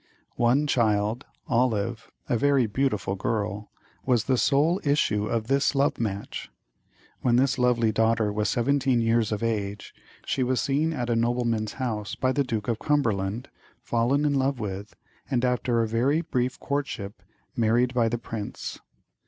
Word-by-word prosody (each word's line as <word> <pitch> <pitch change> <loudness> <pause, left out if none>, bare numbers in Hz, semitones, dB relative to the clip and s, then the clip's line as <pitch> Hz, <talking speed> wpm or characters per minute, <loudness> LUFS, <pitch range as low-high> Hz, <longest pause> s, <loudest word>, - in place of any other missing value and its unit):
One 125 +5 +3
child, 110 -3 +1 0.2
Olive, 115 -1 0 0.2
a - - +1
very 140 +1 +3
beautiful 110 -3 -1
girl, 105 0 -2 0.3
was 125 -4 +2
the 130 - +1
sole 150 +8 +2
issue 110 -8 +1
of 115 -2 -1
this 140 +3 +1
love 140 +1 +1
match. 100 -3 -4 0.7
When 120 -1 +3
this 130 +1 +2
lovely 120 -3 +3
daughter 110 -1 +1
was 105 0 0
seventeen 135 0 +2
years 115 -1 +2
of 105 +1 -2
age, 105 -3 -3 0.3
she 135 - -1
was 130 0 +1
seen 150 +3 +1
at 120 -6 -2
a - - +2
nobleman's 115 -2 0
house 110 -6 -3
by 130 - +1
the 140 +1 +1
Duke 110 -5 -3
of 115 -2 -1
Cumberland, 110 -6 0 0.3
fallen 125 +5 +1
in 145 - +2
love 135 -1 +1
with, 100 0 -5 0.3
and 130 -2 +1
after 125 -1 +1
a - - -1
very 130 +8 +1
brief 130 -6 -2
courtship 115 -8 -4 0.3
married 120 +1 +2
by 120 -2 +2
the 120 - -1
prince. 110 -3 -6
120 Hz, 155 wpm, -26 LUFS, 110-135 Hz, 0.7 s, One